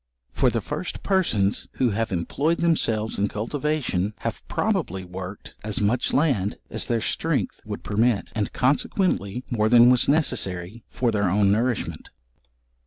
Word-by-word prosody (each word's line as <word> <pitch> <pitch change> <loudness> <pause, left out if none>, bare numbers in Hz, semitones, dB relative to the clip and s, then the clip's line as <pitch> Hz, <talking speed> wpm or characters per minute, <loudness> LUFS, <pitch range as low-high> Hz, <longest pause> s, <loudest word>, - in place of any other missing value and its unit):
For - - +3
the - - -1
first - - -5
persons 115 - +1
who 125 -3 +1
have 110 +2 -1
employed 140 - 0
themselves 115 -12 +1
in 100 - +2
cultivation, 115 -3 -2
have - - -3
probably 95 +2 -1
worked 90 +2 -8
as 105 -1 -1
much 110 +4 +1
land 125 - +1
as - - -3
their 115 -2 0
strength - - -1
would - - -6
permit, 110 +1 +1
and, 105 -3 -2
consequently 130 - 0
more 110 -2 +2
than 120 +1 +7
was 125 +1 +3
necessary 105 - 0
for 120 -2 0
their 100 -3 +1
own 100 +1 +3
nourishment. 115 +2 -1
110 Hz, 145 wpm, -24 LUFS, 100-130 Hz, -, than